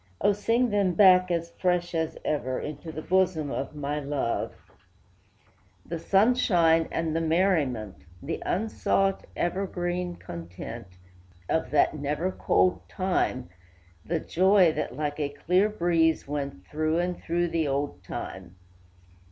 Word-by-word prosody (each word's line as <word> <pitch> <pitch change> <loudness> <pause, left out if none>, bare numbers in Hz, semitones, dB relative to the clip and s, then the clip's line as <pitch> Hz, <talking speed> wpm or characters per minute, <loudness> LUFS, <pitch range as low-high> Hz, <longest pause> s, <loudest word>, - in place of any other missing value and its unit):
O, 205 - +3
sing 230 +4 +1
them 200 -4 +1
back, 185 -1 +6
as 170 -1 -1
fresh 180 -1 0
as 160 -1 -1
ever, 130 -4 -1
Into 155 +2 -6
the 155 0 -7
bosom 180 -6 +1
of 140 +3 -4
my 145 0 -2
love, 140 -4 -2 1.3
The 170 0 -5
sunshine 180 -6 +3
and 160 -1 -1
the 165 - +1
merriment, 155 - 0 0.2
The 145 +4 -5
unsought, 195 -1 0
evergreen 175 -1 -2
content, 90 - -8 0.6
Of 160 - 0
that 145 +2 +3
never 150 +6 -1
cold 90 - +1
time, 130 - -1 0.5
The 170 0 -1
joy, 185 +1 +4
that, 125 - -3
like 150 0 -2
a 145 -2 0
clear 180 +8 +2
breeze, 170 -6 +1
went 140 -10 -4
Through 155 - -1
and 175 0 -1
through 175 +1 0
the 165 -2 0
old 140 +1 -2
time! 95 -1 -7
165 Hz, 130 wpm, -27 LUFS, 145-180 Hz, 1.3 s, back